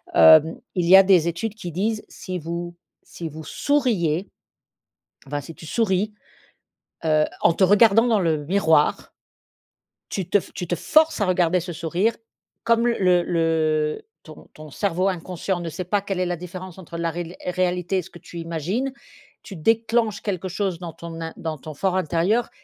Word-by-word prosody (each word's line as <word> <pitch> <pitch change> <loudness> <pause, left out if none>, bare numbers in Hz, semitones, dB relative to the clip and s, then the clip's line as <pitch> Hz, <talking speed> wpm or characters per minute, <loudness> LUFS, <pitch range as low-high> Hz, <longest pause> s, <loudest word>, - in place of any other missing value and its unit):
Hem, 160 - +7 0.2
il 180 -2 +1
y 190 - +9
a 195 - +8
des 185 -4 +4
études 205 +6 -3
qui 175 -5 -7
disent: 210 +6 -1
«Si 185 -1 -6
vous 170 +2 -5 0.3
si 165 -2 -7
vous 155 +1 -10
souriez» 200 - 0 1.0
enfin 145 +1 -3
si 160 +3 -10
tu - - -13
souris, 205 +3 0 0.9
heu, 155 -1 +4 0.2
en 170 - +4
te 190 - +3
regardant 215 +4 +5
dans 225 -4 +2
le 160 -4 0
miroir 160 -3 +2 1.0
tu 190 -4 -3
te 205 - +4
tu 180 - -6
te 175 - 0
forces 310 - +3
à - - +3
regarder 180 -1 +2
ce 175 +1 -6
sourire. 175 +7 0 0.5
Comme 230 +1 +3
le 185 -6 +3
le 160 -2 0 0.2
ton 155 -1 -13
ton 155 -1 -11
cerveau 185 +2 0
inconscient 180 0 -3
ne 170 - -4
sait 165 +4 -5
pas 205 +2 0
quelle 195 -2 -4
est 185 - +1
la 175 0 -1
différence 180 +1 -9
entre 170 -1 -8
la 170 0 -1
rél 175 +1 -6
réalité 180 +1 0
et - - -2
ce - - -13
que - - -13
tu 170 - -10
imagines, 170 - -2 0.5
tu 195 - -9
déclenches 225 +3 +1
quelque 190 -4 -3
chose 190 -2 -2
dans 170 -3 -7
ton 165 -1 -8
in 160 0 -4
dans 160 -1 -4
ton 155 +3 -8
for 185 +4 0
intérieur 185 +6 +1
180 Hz, 180 wpm, -23 LUFS, 165-200 Hz, 1.0 s, y